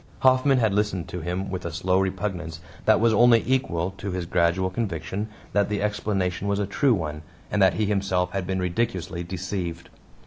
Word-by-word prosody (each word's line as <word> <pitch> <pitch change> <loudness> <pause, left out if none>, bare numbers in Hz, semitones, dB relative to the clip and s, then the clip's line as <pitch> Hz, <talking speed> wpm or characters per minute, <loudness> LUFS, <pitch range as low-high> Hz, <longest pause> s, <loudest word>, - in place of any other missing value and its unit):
Hoffman 130 +1 +4
had 110 -5 +2
listened 100 -4 0
to 90 - -5
him 90 +4 -3
with 95 - -4
a 85 - -4
slow 90 +3 +1
repugnance 95 -4 -2 0.3
that - - +5
was 115 0 +4
only 115 +1 +6
equal 95 -9 0
to 100 - -4
his 90 -2 -3
gradual 90 +2 +1
conviction 100 0 -3 0.3
that 100 0 +2
the 105 -1 -1
explanation 100 -3 -1
was 100 0 +1
a 100 - 0
true 125 +5 +2
one, 75 -4 -4 0.3
and 105 - +1
that 95 - +5
he 110 - +1
himself 95 -3 0
had 95 -2 -3
been 95 0 -1
ridiculously 90 -1 -2
deceived. 90 -1 -4
95 Hz, 185 wpm, -25 LUFS, 90-105 Hz, 0.3 s, only